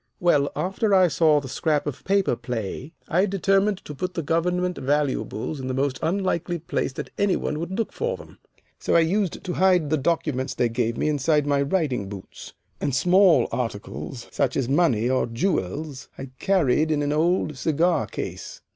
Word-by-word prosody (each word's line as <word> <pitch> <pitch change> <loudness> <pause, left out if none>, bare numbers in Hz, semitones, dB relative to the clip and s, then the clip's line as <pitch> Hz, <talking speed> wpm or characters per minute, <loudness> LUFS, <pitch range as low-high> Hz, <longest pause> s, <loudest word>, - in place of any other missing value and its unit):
Well, 145 -5 +3
after 195 +3 +1
I 185 -2 +5
saw 155 0 +4
the 140 - -8
'Scrap 150 +3 0
of 145 - -5
Paper' 195 -8 +2
play, 120 +3 -5 0.2
I 185 +5 +2
determined 195 +1 +1
to 150 - -7
put 180 +6 -4
the 165 - -2
government 180 +3 0
valuables 145 -1 -1
in 130 - -5
the 130 - -2
most 135 0 -1
unlikely 175 -1 -1
place 165 -4 -2
that - - -6
any 200 -2 +3
one 150 - -2
would 175 +3 -4
look 225 - -2
for - - -2
them. - - -14 0.4
So - - 0
I 170 - +7
used 185 +2 0
to 180 - -3
hide 180 -5 +3
the 155 - +3
documents 140 -3 -1
they 120 - +1
gave 115 0 -1
me - - 0
inside 150 0 +2
my 140 -1 +2
riding 140 - 0
boots, 100 -2 -10 0.3
and 140 - -1
small 180 +3 +5
articles, 115 +1 -5
such 140 -2 0
as 135 -3 0
money 135 -6 +2
or 130 -1 +1
jewels, 135 - -2
I 135 -1 -8
carried 160 -5 +2
in 150 -2 +1
an 145 0 0
old 160 0 +1
cigar 160 +4 +1
case. - - -6
150 Hz, 180 wpm, -24 LUFS, 130-180 Hz, 0.4 s, I